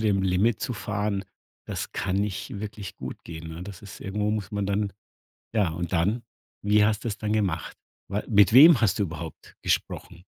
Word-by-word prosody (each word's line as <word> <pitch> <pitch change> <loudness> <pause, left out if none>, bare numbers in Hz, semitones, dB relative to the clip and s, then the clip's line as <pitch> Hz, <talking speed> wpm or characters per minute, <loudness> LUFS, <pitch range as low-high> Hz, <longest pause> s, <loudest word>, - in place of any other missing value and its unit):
dem 100 -3 +2
Limit 95 +4 +2
zu - - -2
fahren, 105 -1 -2 0.4
das - - -4
kann 95 0 -1
nicht 100 0 -2
wirklich 105 -3 -6
gut - - -7
gehen, 80 -1 -7
ne? 80 +2 -7
Das 100 0 -9
ist 100 -1 -10
irgendwo 105 +1 -1
muss 105 -2 -2
man 100 -1 -1
dann 100 0 0 0.6
ja, 105 -6 +3
und 85 +2 -4
dann, 100 +8 +1 0.4
wie 105 0 +4
hast 105 0 0
du's 105 -3 -2
dann 105 0 -1
gemacht? 95 -7 -1 0.3
Wa 100 +1 -1
mit 100 -2 +5
wem 140 -1 +9
hast 110 0 +2
du - - +3
überhaupt 80 -2 -7
gesprochen? 85 - -2
100 Hz, 185 wpm, -26 LUFS, 90-105 Hz, 0.6 s, wem